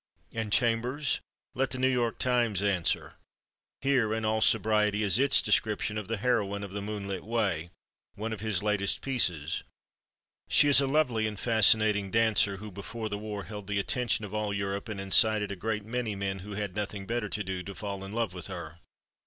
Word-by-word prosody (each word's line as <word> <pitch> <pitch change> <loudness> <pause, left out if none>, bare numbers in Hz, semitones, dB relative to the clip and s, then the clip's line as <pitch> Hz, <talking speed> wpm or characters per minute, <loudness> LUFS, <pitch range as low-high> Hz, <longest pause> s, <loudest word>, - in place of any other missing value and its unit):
And 110 -2 -3
Chambers? 125 +5 +1 0.3
Let 135 +1 0
the 130 - -4
New 130 +1 +2
York 120 -3 0
Times 120 -6 +1
answer. 95 -5 0 0.6
Here, 125 -6 +2
in 110 0 -2
all 110 0 +1
sobriety, 105 -1 +3
is 100 +2 +3
its 140 0 +5
description 105 0 +1
of 105 -3 -4
the 115 0 -2
heroine 100 -3 0
of 100 - -7
"The 100 +1 -4
Moonlit 100 -2 -4
Way," 100 -7 -1 0.5
one 110 +2 -4
of 110 - -6
his 105 -3 -1
latest 105 -2 +1
pieces: 90 - 0 0.9
She - - +6
is 140 -1 +7
a 135 - 0
lovely 125 -7 +1
and 105 -2 -6
fascinating 110 -3 +4
dancer 105 -2 +3
who, 105 +2 -9
before 110 +3 -6
the 105 - -4
war, 105 -1 -5
held 105 -2 -8
the 105 -1 -1
attention 110 +2 0
of 105 - -10
all 105 -1 -1
Europe 100 +2 -3
and 100 -2 -5
incited 105 +1 +4
a - - -3
great 105 +1 -3
many 115 -2 -2
men 95 0 -3
who 105 +3 -8
had 100 -2 -4
nothing 100 -1 -4
better 115 0 -2
to 100 +3 -3
do 95 -1 -4
to 100 +2 -8
fall 100 -2 -5
in 95 - -7
love 115 -4 -1
with 90 -2 -4
her. 85 -3 -8
105 Hz, 195 wpm, -29 LUFS, 100-115 Hz, 0.9 s, is